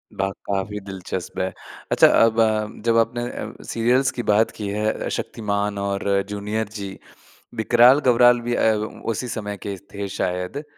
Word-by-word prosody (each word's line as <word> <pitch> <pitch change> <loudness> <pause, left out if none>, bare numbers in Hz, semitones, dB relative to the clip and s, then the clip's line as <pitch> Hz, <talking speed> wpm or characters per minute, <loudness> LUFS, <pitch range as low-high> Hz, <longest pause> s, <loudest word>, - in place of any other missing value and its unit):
वाह! 95 0 0 0.2
काफ़ी 100 +1 -2
दिलचस्प 95 -2 -6
है। 95 0 -1 0.4
अच्छा - - +7
अब 115 0 +4
अ, 110 -1 +2 0.2
जब 115 0 +3
अपने 115 +1 +1
अ, - - -8
सीरियल्स 125 +3 +1
की 120 - -4
बात 110 +2 +3
की 105 - -3
है। 105 +1 0
अ, - - -4
शक्तिमान 105 -2 -2
और 100 0 -2 0.2
जूनियर 105 +2 -3
जी। 100 -1 -6 0.6
विकराल-गबराल 120 +1 +5
भी 120 - 0
अ, 110 - +3 0.4
उसी 125 +4 -4
समय 105 -3 -4
के 100 -1 -3 0.2
थे 100 0 -4
शायद। 90 +7 -2
अ, 145 - -5
105 Hz, 160 wpm, -22 LUFS, 100-115 Hz, 0.6 s, अच्छा